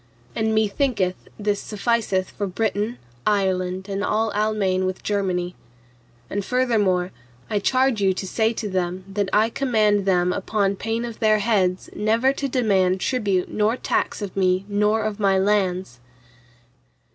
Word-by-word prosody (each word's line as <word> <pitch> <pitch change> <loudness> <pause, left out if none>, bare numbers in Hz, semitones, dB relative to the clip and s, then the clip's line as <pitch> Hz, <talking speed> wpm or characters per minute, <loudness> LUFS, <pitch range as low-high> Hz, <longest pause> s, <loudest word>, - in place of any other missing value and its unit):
And 220 -1 +1
methinketh 215 -3 +1 0.2
this 205 -1 -1
sufficeth 210 -3 -1
for 205 - -3
Britain, 210 +4 -1 0.3
Ireland 190 -2 0
and 200 0 -3
all 220 0 +1
Almaine 200 -3 +1
with 185 0 -4
Germany. 185 -3 -1 0.7
And 200 0 -3
furthermore, 205 -7 +1 0.4
I 205 - +2
charge 255 +1 +2
you 195 -1 +4
to 190 +1 -4
say 220 +4 +1
to 225 -2 -4
them, 185 -1 -2
that 195 0 -2
I 220 +2 +3
command 215 -7 +1
them 180 -1 +3
upon 200 +1 0
pain 225 +4 -2
of 235 -2 -8
their 215 -1 +4
heads 195 -4 +1
never 225 +5 +2
to 275 0 -2
demand 195 -7 +2
tribute 200 -6 0
nor 215 +3 +1
tax 210 - -1
of 195 - -6
me 185 0 +2
nor 210 +2 +1
of 215 -1 -3
my 195 -2 +3
lands. 190 -8 0
205 Hz, 145 wpm, -23 LUFS, 190-220 Hz, 0.7 s, you